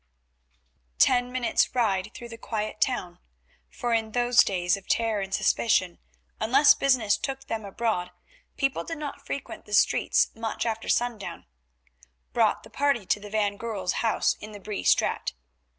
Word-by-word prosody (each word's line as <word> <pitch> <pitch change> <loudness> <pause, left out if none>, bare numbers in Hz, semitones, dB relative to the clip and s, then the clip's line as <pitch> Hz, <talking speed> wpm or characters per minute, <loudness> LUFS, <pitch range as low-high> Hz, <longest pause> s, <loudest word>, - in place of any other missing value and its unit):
Ten 245 - +3
minutes' 255 0 +1
ride 210 -4 +1
through 240 -1 -9
the 230 - -9
quiet 215 -1 -4
town, 180 -9 -1 0.5
for 240 -1 -2
in 220 -1 0
those 245 0 +5
days 175 -2 +1
of 195 -1 -12
terror 225 -3 +1
and 195 0 -5
suspicion 185 -3 +1 0.4
unless 270 +7 +6
business 245 -7 +2
took 270 -1 -5
them 225 -1 -4
abroad 200 -3 -2 0.5
people 275 -2 0
did 330 -1 -6
not 285 -1 -6
frequent 280 - -6
the 210 - -9
streets - - +3
much 225 0 -3
after 225 -1 -3
sundown, 240 -4 -1 0.9
brought - - +2
the - - -15
party 280 -7 +1
to 185 +3 +1
the 205 0 -10
van 205 -1 0
Goorl's 205 -6 -2
house 225 -2 +2
in 215 0 -9
the 205 - -9
Bree 205 +1 -5
Straat. - - +2
225 Hz, 155 wpm, -26 LUFS, 205-245 Hz, 0.9 s, unless